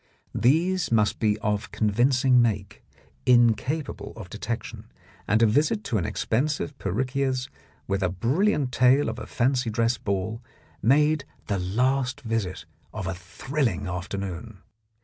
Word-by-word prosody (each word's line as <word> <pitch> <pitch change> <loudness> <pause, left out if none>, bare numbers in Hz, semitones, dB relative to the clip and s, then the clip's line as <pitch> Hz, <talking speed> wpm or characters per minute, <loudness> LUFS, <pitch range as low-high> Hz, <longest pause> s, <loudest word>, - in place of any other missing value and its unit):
These 165 +7 +2
must 110 -2 +2
be 105 -1 +2
of 105 +1 -1
convincing 125 +4 +3
make, 105 -4 -1 0.4
incapable 125 +5 +2
of 95 -5 -10
detection; 110 +2 -5 0.4
and 110 +2 +3
a - - +7
visit 150 - +2
to 115 - 0
an 85 - -2
expensive 145 +4 -1
perruquier's, 130 +5 -1 0.4
with 100 0 -1
a 95 - +2
brilliant 135 - +1
tale 130 +2 +4
of 115 +2 -5
a - - -7
fancy 125 -1 +1
dress 115 +2 +1
ball, 100 +3 -2 0.4
made 150 +4 +3 0.2
the 100 -2 -1
last 125 +8 0
visit 115 -6 -3 0.3
of 105 -3 -5
a 95 - -2
thrilling 95 - -2
afternoon. 95 +2 -5
115 Hz, 130 wpm, -26 LUFS, 100-135 Hz, 0.4 s, a